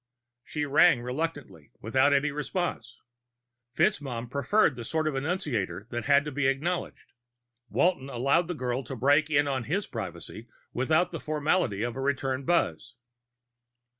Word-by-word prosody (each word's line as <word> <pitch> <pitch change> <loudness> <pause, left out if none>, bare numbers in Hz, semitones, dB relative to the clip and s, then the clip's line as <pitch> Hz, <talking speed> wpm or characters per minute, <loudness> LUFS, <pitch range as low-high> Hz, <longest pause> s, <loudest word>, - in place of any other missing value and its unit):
_" - - -59 0.4
She 150 +2 -3
rang, 145 -2 +4
reluctantly, 135 - -5
without 130 +6 +2
any 145 +1 +2
response. 145 -5 -3 0.8
FitzMaugham 125 -4 0
preferred 140 - +2
the 120 - -7
sort 155 +6 -1
of 155 - 0
annunciator 135 - -2
that 120 0 -3
had 145 0 +4
to 150 - -4
be 140 0 0
acknowledged; 160 +7 -2 0.6
Walton 170 -7 +1
allowed 140 +7 +1
the 175 - -3
girl 125 -1 -2
to 135 - -6
break 145 +5 +3
in 145 -1 +3
on 130 -4 -2
his 195 +6 -1
privacy 110 +1 -7 0.3
without 155 +7 +1
the 165 - -5
formality 150 - 0
of 120 -1 -3
a 135 - -4
return 135 -1 -1
buzz. 150 - 0
140 Hz, 150 wpm, -28 LUFS, 125-155 Hz, 0.8 s, rang